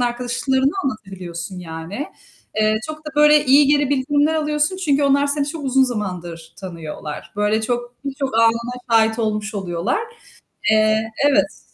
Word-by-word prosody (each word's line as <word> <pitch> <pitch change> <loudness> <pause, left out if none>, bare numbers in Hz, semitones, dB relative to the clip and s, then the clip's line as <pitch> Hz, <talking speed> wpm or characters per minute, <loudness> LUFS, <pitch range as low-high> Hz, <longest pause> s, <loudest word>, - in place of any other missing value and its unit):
arkadaşlarına 250 +3 0
anlatabiliyorsun 185 -6 -5
yani. 170 - -6 0.5
Eee, 215 0 +3
çok 310 0 -6
da - - -4
böyle 300 0 +6
iyi 280 +2 +6
geri 290 -1 +3
bildirimler 290 +3 +2
alıyorsun, 300 +3 0
çünkü 290 -6 +1
onlar 280 0 +3
seni 285 0 0
çok 310 -2 -6
uzun 265 0 +3
zamandır 175 -8 -5
tanıyorlar. 165 -4 -7
Böyle 210 +1 +1
çok 240 +1 -3
birçok 270 -3 -3
anına 230 +1 +2 0.2
şahit 225 0 +3
olmuş 215 -1 -2
oluyorlar. 185 - -1 0.7
Eee, 215 +1 +3 0.2
evet. 285 - +1
240 Hz, 140 wpm, -20 LUFS, 210-285 Hz, 0.7 s, böyle